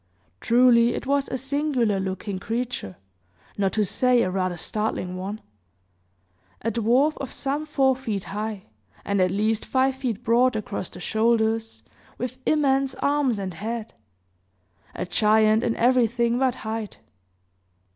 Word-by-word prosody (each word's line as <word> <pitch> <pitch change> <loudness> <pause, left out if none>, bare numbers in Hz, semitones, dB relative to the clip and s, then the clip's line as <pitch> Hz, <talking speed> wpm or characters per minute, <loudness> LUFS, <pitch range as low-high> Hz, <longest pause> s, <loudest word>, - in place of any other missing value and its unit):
Truly, 240 0 +4
it - - -5
was 280 +1 0
a 260 - -2
singular 265 -6 0
looking 190 +1 -4
creature, 230 - -4 0.6
not 195 -2 0
to 215 -1 +1
say 245 +5 +3
a 185 - -1
rather 185 -2 -1
startling 200 -1 -3
one. 195 +4 -5 1.2
A 230 - 0
dwarf 245 +7 +2
of 270 -3 -6
some 285 +3 -3
four 270 -3 +2
feet 220 -7 -4
high, 210 -1 -5 0.4
and 200 -1 +1
at 185 - +3
least 215 +3 0
five 265 0 +1
feet 245 -4 -3
broad 240 +2 +3
across 210 -3 -4
the 180 - -11
shoulders, 225 +2 0 0.3
with 255 +1 -5
immense 275 -3 +2
arms 280 -5 +1
and 190 -2 -4
head 220 +5 -5 1.0
a - - -3
giant 215 +3 +3
in 230 - 0
everything 235 -1 +2
but 260 -2 +2
height. 220 -1 -5
230 Hz, 135 wpm, -24 LUFS, 210-255 Hz, 1.2 s, Truly